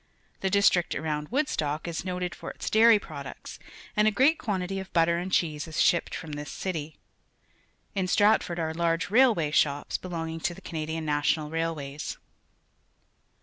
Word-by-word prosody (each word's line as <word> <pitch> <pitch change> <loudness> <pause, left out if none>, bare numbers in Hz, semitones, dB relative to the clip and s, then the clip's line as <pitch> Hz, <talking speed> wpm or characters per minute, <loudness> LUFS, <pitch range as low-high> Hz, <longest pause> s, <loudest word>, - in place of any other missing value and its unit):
The 190 - 0
district 190 -3 +3
around 150 -1 -3
Woodstock 170 - -1
is 170 -1 -3
noted 180 -1 -3
forjts - - -6
dairy 225 0 +7
products, 140 -8 -9 0.4
and 210 0 +4
a - - +7
great 265 +9 +3
quan 200 -5 -1
tity 195 +2 -3
of 190 - -11
butter 170 0 +3
and 185 +2 -5
cheese 155 -4 0
is 160 - -9
sliipped 170 - +2
from 160 -3 -7
this 145 0 -6
city. 160 -5 -4 1.0
Iii" 190 -2 0
Stratford 205 -3 +3
are_ 160 -1 -2
large 170 +1 0
railway 220 - +4
shops, 145 -1 +1
belonging 165 -2 -4
to 175 +1 -2
the - - -13
Ca - - -10
nadian 160 0 -3
National 150 +1 0
Railways. 155 -3 -3
170 Hz, 160 wpm, -27 LUFS, 155-190 Hz, 1.0 s, dairy